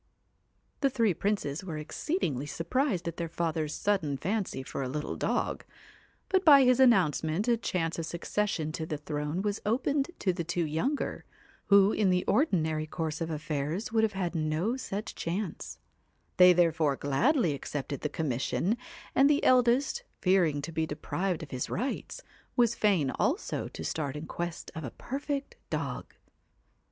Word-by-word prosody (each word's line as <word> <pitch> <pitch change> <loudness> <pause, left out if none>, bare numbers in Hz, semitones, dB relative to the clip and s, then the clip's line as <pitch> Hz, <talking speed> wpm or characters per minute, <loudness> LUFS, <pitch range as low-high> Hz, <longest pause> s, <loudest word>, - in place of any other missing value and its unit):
CAT - - -39
The 275 - +4
three 230 -6 +2
princes 190 -5 -1
were 165 -5 -5
exceedingly 150 - -2
surprised 185 - -1
at 170 - -4
their 170 -1 -3
father's 160 -2 -1
sudden 165 -9 0
fancy 190 -2 -2
for 130 - -5
a 130 - -2
little 150 +3 -3
dog, - - -1 0.6
but 380 -1 +2
by 285 -5 +8
his 250 0 +4
announcement 190 - +3
a 240 - +4
chance 170 -7 -2
of 165 - -3
succession 170 -2 -1
to 160 0 -4
the 155 - -3
throne 150 +4 -3
was 205 0 -1
opened 270 +6 +1
to 185 - +1
the 175 -1 -3
two 175 +1 -1
younger, 165 - -2 0.4
who 200 0 +6
in 210 -3 +2
the 180 0 +2
ordinary 160 - +1
course 155 0 -3
of 165 - -2
affairs 155 +5 -3
would 225 -1 +3
have 220 -1 +1
had 185 -3 -2
no 160 +8 0
such 210 -5 -5
chance; 175 +1 -4 0.6
they 180 0 +9
therefore 160 -4 +3
gladly 170 - +2
accepted 140 0 -4
the 150 - -1
com 160 +1 -3
mission, 165 - 0 0.4
and 275 +1 +5
the 295 -1 +3
eldest, 255 - +3 0.2
fearing 175 -7 +2
to 165 - -5
be 160 0 -1
deprived 175 +4 -2
of 145 - -10
his 125 -1 -3
rights, 255 +7 -3 0.3
was 235 -2 +4
fain 185 - +2
also 330 +10 -1
to - - -8
start 145 -3 -2
in 150 +2 -5
quest 170 +1 -5
of 160 - -6
a 130 - -4
perfect 280 - -4
dog. - - -4
175 Hz, 165 wpm, -29 LUFS, 155-220 Hz, 0.6 s, they